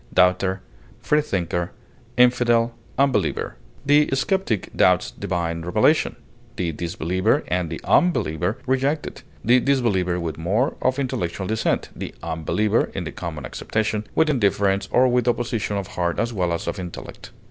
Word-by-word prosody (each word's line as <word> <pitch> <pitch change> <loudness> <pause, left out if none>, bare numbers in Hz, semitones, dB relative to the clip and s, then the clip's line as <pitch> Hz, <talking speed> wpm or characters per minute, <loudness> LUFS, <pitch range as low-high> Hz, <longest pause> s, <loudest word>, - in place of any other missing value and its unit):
atheist, 90 0 +5 0.6
disbeliever, 90 - 0 0.5
freethinker, 120 - +2 0.3
The 145 +1 +4
skeptic 135 - -1
doubts - - +3
divine 85 -2 -3
revelation; 105 - +2 0.4
the 85 -2 -1
disbeliever 85 +2 0
and 90 -1 -1
the 80 - -5
unbeliever 105 - +2
reject 135 +4 +1
it, - - -8 0.2
the 120 +3 +6
disbeliever 110 -10 +1
with 80 -2 -4
more 100 +11 +1
of 130 +1 +1
intellectual 95 -9 -2
dissent, 110 +3 0
the - - -6
unbeliever 105 +8 +1
(in 95 - -2
the 80 - -5
common 80 -5 -6
acceptation) 110 - -2
with 160 - +4
indifference 100 -5 +1
or 130 +1 +5
with 125 -1 +1
opposition 115 -4 0
of 100 - -3
heart 85 -1 -1
as 115 +1 -1
well 90 -4 0
as 85 - -2
of - - -3
intellect. 90 -2 -8
105 Hz, 135 wpm, -23 LUFS, 90-125 Hz, 0.6 s, the